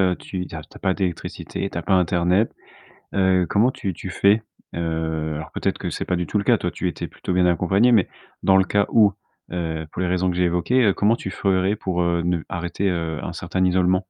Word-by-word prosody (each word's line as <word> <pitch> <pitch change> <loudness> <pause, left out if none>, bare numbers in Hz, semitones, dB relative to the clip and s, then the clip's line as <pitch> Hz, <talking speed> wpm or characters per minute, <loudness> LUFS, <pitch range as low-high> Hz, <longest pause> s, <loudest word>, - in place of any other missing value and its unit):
heu, 90 -2 +2
tu 90 -1 -5
tu - - -8
as - - -6
tu - - -18
as - - -11
pas 95 - +1
d'électricité, 95 +1 -4
tu - - -4
as - - -4
pas 95 - -1
internet, 90 +3 +2 0.6
heu, 95 -2 +3
comment 115 +5 +3
tu 95 -6 -4
tu 95 - -8
fais, 100 +3 +3 0.3
heu, 80 -2 -2
alors 80 +1 -6
peut-être - - -1
que - - -4
c'est - - -4
pas 90 - 0
du 90 -1 -2
tout 105 - 0
le 100 - -1
cas, - - +5
toi, - - -2
tu - - -2
étais - - -5
plutôt 90 - -5
bien 90 - +3
accompagnée 95 +7 +3
mais 105 -5 +4 0.3
dans 95 - +5
le 95 - +5
cas 100 +1 +1
où, 105 -3 +5 0.4
heu, 80 -3 -3
pour - - -5
les 90 - 0
raisons 90 +1 +1
que 90 - -3
j'ai 90 - +2
évoquées, 100 +6 +3
comment 105 +2 +3
tu 95 - -6
ferais 95 +1 +1
pour, 90 -3 -2
heu, 85 -1 +1
ne 90 0 +1
arrêter, 90 +3 -2
heu, 85 -3 -2
un 90 - -5
certain 90 +2 -2
isolement? 90 0 +3
90 Hz, 240 wpm, -22 LUFS, 85-95 Hz, 0.6 s, cas